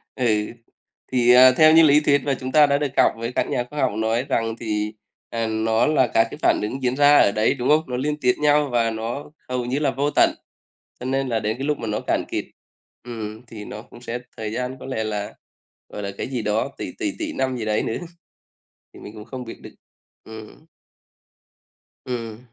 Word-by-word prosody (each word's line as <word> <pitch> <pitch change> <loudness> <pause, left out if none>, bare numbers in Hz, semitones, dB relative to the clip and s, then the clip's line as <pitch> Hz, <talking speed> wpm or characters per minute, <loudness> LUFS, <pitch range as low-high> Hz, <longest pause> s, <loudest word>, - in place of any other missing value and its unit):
Ừ, 130 - -1 0.9
thì, 125 -1 +4
à, 130 +1 +9
theo 155 +4 +6
như 165 - +8
lý 150 -1 +6
thuyết 145 -2 +2
mà 140 - 0
chúng 130 0 -5
ta 150 +1 +7
đã 140 0 +2
được 145 0 0
đọc - - +4
với 115 +1 -4
các - - 0
nhà 120 - 0
khoa 150 - -6
học 130 - +2
nói 110 +3 0
rằng 115 -1 0
thì, 105 -1 -2 0.4
à, 115 -1 -2
nó 110 +1 +1
là 140 -5 +3
các 115 0 +3
cái - - -7
phản - - +3
ứng 130 +6 -4
diễn 125 0 +1
ra 145 +1 +6
ở - - +5
đấy, 110 +2 +2
đúng 125 -2 -2
không? 155 +1 +4
Nó 125 -1 -3
liên 150 +3 -1
tiếp 125 0 +4
nhau 150 -1 +3
và 115 -1 +2
nó 115 +6 -5 0.2
hầu 125 -1 -2
như 130 +4 -1
là 145 -3 +1
vô 140 +2 0
tận. - - +4 0.6
Cho 125 - -7
nên 135 +1 0
là 115 -2 0
đến 110 +2 -2
cái 135 - -4
lúc 150 -1 0
mà 115 - -4
nó 105 0 -1
cạn - - 0
kiệt, - - -3 0.6
ừm, 110 -2 -7
thì 105 -2 -9
nó 105 - -8
cũng 120 - -16
sẽ 120 0 -4 0.2
thời 110 -1 -4
gian 125 +2 -3
có - - -10
lẽ 130 -4 -3
là, 105 -1 -4 0.6
gọi 105 - -7
là, 100 - -3
cái - - -3
gì 125 -2 -3
đó, 110 +5 0
tỷ, - - -5
tỷ, 310 - -1
tỷ 310 -2 -3
năm 130 - -1
gì 115 - -4
đấy 110 0 0
nữa. 115 - -2 1.0
Thì - - -13
mình 105 - -10
cũng 105 -1 -10
không 130 0 -7
biết 115 - -10
được. - - -12 0.5
Ừm. 110 +7 -12 1.4
Ừm. 115 -3 -5
125 Hz, 225 wpm, -22 LUFS, 110-140 Hz, 1.4 s, à